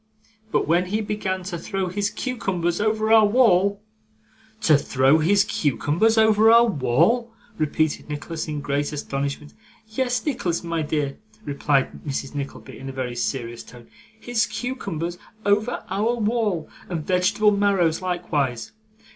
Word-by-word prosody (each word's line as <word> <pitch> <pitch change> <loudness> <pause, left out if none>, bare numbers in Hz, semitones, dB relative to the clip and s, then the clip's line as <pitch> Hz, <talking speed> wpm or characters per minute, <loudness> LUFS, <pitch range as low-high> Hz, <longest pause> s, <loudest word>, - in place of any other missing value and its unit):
But - - +1
when 175 +2 +3
he 210 +4 -1
began 195 -3 -3
to 180 -2 -5
throw 195 +3 -3
his 200 +3 -1
cucumbers 195 -10 -2
over 220 +1 +2
our 220 -1 +7
wall 200 -3 +3 0.4
' 220 - -32
'To 160 -8 +5
throw 135 +1 +3
his 195 +5 +4
cucumbers 170 - +1
over 220 0 +5
our 235 +1 +7
wall!' 195 - +1 0.3
repeated 155 0 0
Nicholas, 155 +2 -5
in 150 -1 -4
great 145 +1 -1
astonishment. 140 0 -4 0.3
'Yes, 245 +3 -2
Nicholas, 180 - -1
my 165 -1 -2
dear,' 150 -2 -2 0.3
replied 140 -1 0
Mrs. 135 -1 -4
Nickleby 140 -1 -7
in 135 - -7
a - - -4
very 130 -2 -4
serious 120 -1 -3
tone; 120 -1 -15 0.3
'his 225 -2 0
cucumbers 175 - -4 0.3
over 210 +4 +1
our 225 +4 +1
wall. 210 -7 0 0.2
And 165 -4 -3
vegetable 205 +3 +3
marrows 195 -5 +2
likewise. 155 -9 -2
180 Hz, 140 wpm, -23 LUFS, 150-215 Hz, 0.4 s, our